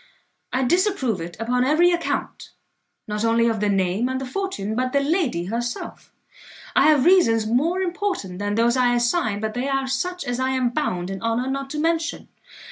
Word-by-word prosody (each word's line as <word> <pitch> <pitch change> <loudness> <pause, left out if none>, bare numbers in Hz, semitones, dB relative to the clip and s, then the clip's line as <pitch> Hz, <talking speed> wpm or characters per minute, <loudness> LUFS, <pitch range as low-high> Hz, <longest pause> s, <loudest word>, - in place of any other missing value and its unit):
I 260 - 0
disapprove 270 - +1
it 175 +1 -7
upon 250 +2 +1
every 315 +6 +4
account, 340 -1 -3 0.6
not 210 0 -3
only 230 +1 +3
of 225 -2 0
the 210 0 +1
name 195 +4 +1
and 260 0 -2
the 270 - -4
fortune, 250 - -3
but 255 +1 -1
the 280 - +4
lady 280 - 0
herself. 240 +4 -5 0.6
I - - +5
have 300 -3 +4
reasons 230 -12 +4
more 310 +12 +1
important 360 - -3
than 205 0 -1
those 235 +2 +3
I 245 -1 +3
assign, 240 - 0
but 220 0 -2
they 250 +3 -2
are 270 -1 0
such 355 +8 -3
as 245 0 -2
I 260 0 0
am 255 -2 +1
bound 185 -10 -2
in 195 - -6
honour 230 +3 -1
not 275 0 -4
to 300 - -4
mention. 330 +1 -1
250 Hz, 190 wpm, -23 LUFS, 220-305 Hz, 0.6 s, I